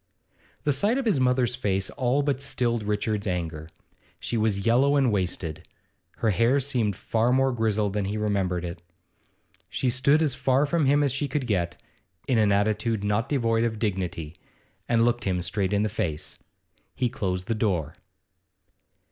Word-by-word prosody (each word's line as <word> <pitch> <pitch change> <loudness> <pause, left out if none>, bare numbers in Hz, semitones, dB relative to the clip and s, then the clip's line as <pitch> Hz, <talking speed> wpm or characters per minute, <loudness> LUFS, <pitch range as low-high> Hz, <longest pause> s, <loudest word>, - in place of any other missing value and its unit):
The 145 - +2
sight 205 - +1
of 270 - -2
his 205 -11 +2
mother's 125 -1 +2
face 100 -6 -1
all 130 +3 +1
but 140 -2 -1
stilled 120 -4 0
Richard's 105 0 -1
anger; 80 -3 -3 0.5
she - - -3
was 110 -3 0
yellow 130 +5 +4
and 135 -4 +3
wasted; 90 -5 -2 0.5
her 110 - +1
hair 115 +7 +3
seemed 125 -7 0
far 115 +6 0
more 135 +1 +3
grizzled 110 -4 0
than 105 -1 -1
he 100 +2 -2
remembered 95 -4 -1
it. 85 0 -6 0.9
She 125 - 0
stood 140 +5 +3
as 145 -5 +1
far 130 +2 +2
from 155 -1 +1
him 145 +2 +4
as 140 - +2
she 135 +3 -1
could 140 0 -2
get, 85 -6 -1 0.5
in 125 -4 +2
an 105 -2 +3
attitude 105 +1 +1
not 105 +5 0
devoid 115 -5 +1
of 115 -2 -1
dignity, 90 -7 -3 0.5
and 115 -1 +3
looked 120 0 0
him 90 -2 0
straight 95 +2 -1
in 100 0 +2
the - - +1
face. 85 -8 -4 0.6
He 125 - +1
closed 95 -7 -3
the 115 - -1
door. 90 -9 -1
110 Hz, 170 wpm, -26 LUFS, 100-130 Hz, 0.9 s, yellow